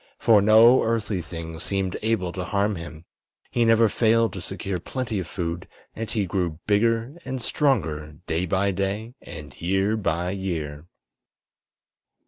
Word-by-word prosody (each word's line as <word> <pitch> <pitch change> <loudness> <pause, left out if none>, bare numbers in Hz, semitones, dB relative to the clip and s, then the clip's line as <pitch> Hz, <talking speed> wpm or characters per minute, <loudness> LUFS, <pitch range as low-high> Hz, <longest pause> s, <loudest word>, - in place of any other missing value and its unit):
For 110 -3 +5
no 110 +5 +7
earthly 110 -4 0
thing 80 0 -7
seemed 95 +1 -1
able 110 -5 0
to 90 0 -4
harm 100 +2 0
him; 85 -1 -9 0.5
he 120 -1 +2
never 115 0 +5
failed 115 +2 +2
to 95 - -6
secure 95 0 -4
plenty 115 +1 -3
of 90 - -4
food, 85 -1 -4 0.3
and 115 0 -4
he 105 -4 0
grew 90 -4 -1
bigger 115 +4 +2
and 130 0 -4
stronger 80 - 0
day 85 +3 -1
by 100 +3 +1
day 100 +5 -2
and 75 -2 -9
year 95 +4 +1
by 90 -4 -1
year. 85 -6 -4
100 Hz, 145 wpm, -25 LUFS, 85-115 Hz, 0.5 s, no